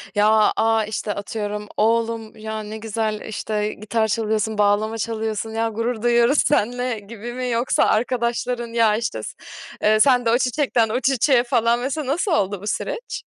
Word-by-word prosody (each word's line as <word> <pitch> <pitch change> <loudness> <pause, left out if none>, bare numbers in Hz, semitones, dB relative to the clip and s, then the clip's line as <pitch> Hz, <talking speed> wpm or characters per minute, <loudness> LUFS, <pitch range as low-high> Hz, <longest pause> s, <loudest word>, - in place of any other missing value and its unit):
Ya, 215 +1 +4
a, 225 -1 +2
işte, 210 -1 -3
atıyorum 210 0 -4
"Oğlum 225 0 0
ya 220 0 -5
ne 215 +1 -7
güzel, 220 -1 -3
işte, 215 -1 -3
gitar 220 +1 -1
çalıyorsun, 220 0 -1
bağlama 210 +2 +2
çalıyorsun, 220 0 -3
ya, 225 0 -1
gurur 230 +1 -3
duyuyoruz 240 +3 +3
seninle." 245 -2 0
gibi 230 +3 -8
mi? 250 0 -3
Yoksa 235 +2 +1
arkadaşların 240 +1 0
"Ya 225 -2 +3
işte, 230 - -3
s - - -6 0.5
eee, 215 0 +4
sen 250 -1 +4
de 230 - +3
o 240 - +4
çiçekten, 250 -3 +1
o 235 - 0
çiçeğe 260 0 +3
falan 235 -1 +2
mesela," 275 +2 -3
nasıl 350 +7 0
oldu 200 - 0
bu 205 - -7
süreç? 480 - -4
225 Hz, 165 wpm, -22 LUFS, 215-240 Hz, 0.5 s, Ya